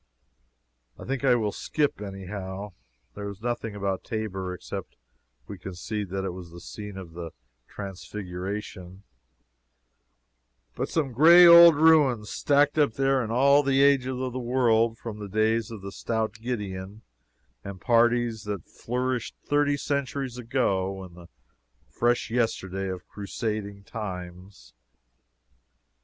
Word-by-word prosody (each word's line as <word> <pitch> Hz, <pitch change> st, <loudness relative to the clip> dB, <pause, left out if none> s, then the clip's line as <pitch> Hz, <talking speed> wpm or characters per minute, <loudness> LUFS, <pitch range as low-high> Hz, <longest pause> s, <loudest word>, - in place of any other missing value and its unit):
I -, -, -10 dB
think 135 Hz, 0 st, -3 dB
I 130 Hz, -2 st, +5 dB
will 110 Hz, -3 st, 0 dB
skip, 145 Hz, -3 st, -1 dB
any 95 Hz, -2 st, -7 dB
how. 95 Hz, +1 st, -6 dB, 0.4 s
There 100 Hz, 0 st, -6 dB
is 100 Hz, -1 st, -9 dB
nothing 115 Hz, -2 st, -3 dB
about 100 Hz, -2 st, -2 dB
Tabor 95 Hz, -4 st, -4 dB
(except 90 Hz, -, -7 dB, 0.5 s
we 100 Hz, -2 st, -9 dB
concede 95 Hz, +2 st, -5 dB
that 95 Hz, +1 st, -3 dB
it 95 Hz, -, -2 dB
was 90 Hz, -2 st, -9 dB
the 85 Hz, +1 st, -11 dB
scene 105 Hz, +2 st, -8 dB
of 90 Hz, -4 st, -9 dB
the 85 Hz, -1 st, -6 dB, 0.4 s
Transfiguration,) 95 Hz, -1 st, -7 dB, 1.7 s
but -, -, -3 dB
some 150 Hz, -5 st, -1 dB
gray 170 Hz, +8 st, +8 dB
old 170 Hz, -1 st, +10 dB
ruins, 145 Hz, -9 st, +4 dB
stacked 145 Hz, +1 st, +2 dB
up 145 Hz, -6 st, +3 dB
there 135 Hz, 0 st, +2 dB
in 110 Hz, -, -5 dB
all 140 Hz, +4 st, +4 dB
ages 135 Hz, -1 st, +4 dB
of 130 Hz, -1 st, -3 dB
the 130 Hz, -, -3 dB
world 115 Hz, -2 st, +2 dB
from 110 Hz, -2 st, -7 dB
the 105 Hz, -1 st, -7 dB
days 110 Hz, +2 st, +1 dB
of 110 Hz, -4 st, -9 dB
stout 110 Hz, -2 st, -2 dB
Gideon 105 Hz, -3 st, -5 dB, 0.6 s
and 100 Hz, -1 st, -8 dB
parties 120 Hz, -1 st, +2 dB
that 100 Hz, -4 st, -4 dB
flourished 125 Hz, 0 st, -3 dB
thirty 145 Hz, 0 st, +2 dB
centuries 140 Hz, -3 st, -3 dB
ago 95 Hz, -6 st, -1 dB
to 85 Hz, -, -19 dB
the 85 Hz, 0 st, -13 dB, 0.6 s
fresh 120 Hz, -1 st, 0 dB
yesterday 95 Hz, -5 st, -1 dB
of 90 Hz, -1 st, -6 dB
Crusading 100 Hz, -1 st, -5 dB
times. 95 Hz, -3 st, -8 dB
110 Hz, 130 wpm, -26 LUFS, 95-125 Hz, 1.7 s, old